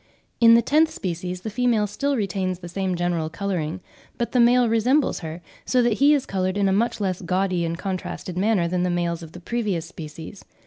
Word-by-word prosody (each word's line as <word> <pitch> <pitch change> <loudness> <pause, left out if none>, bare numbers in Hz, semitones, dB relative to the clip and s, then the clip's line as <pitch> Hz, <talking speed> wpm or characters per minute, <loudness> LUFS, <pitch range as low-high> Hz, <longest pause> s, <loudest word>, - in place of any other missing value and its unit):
In 230 -1 +8
the 235 - +4
tenth 310 +5 +3
species 180 - -4
the 220 - -5
female 235 -2 +2
still 280 +7 -1
retains 190 -3 -1
the 175 -1 -9
same 185 +1 -2
general 170 -2 -1
colouring, 175 -1 -3 0.4
but 235 - -2
the 250 - +2
male 240 +1 +5
resembles 245 +6 +2
her, 165 0 -7 0.2
so 250 -1 +2
that 235 -3 +1
he 285 +2 +6
is 280 - -1
coloured 185 0 -1
in 200 -1 +2
a 190 - +2
much 230 +4 0
less 185 -3 -2
gaudy 185 0 0
and 165 0 -3
contrasted 185 -1 -5
manner 190 -2 +2
than 180 +1 -1
the 180 - +1
males 175 -1 -1
of 165 -1 -11
the 175 - -9
previous 200 -4 -2
species. 160 +3 -9
190 Hz, 210 wpm, -23 LUFS, 175-230 Hz, 0.4 s, In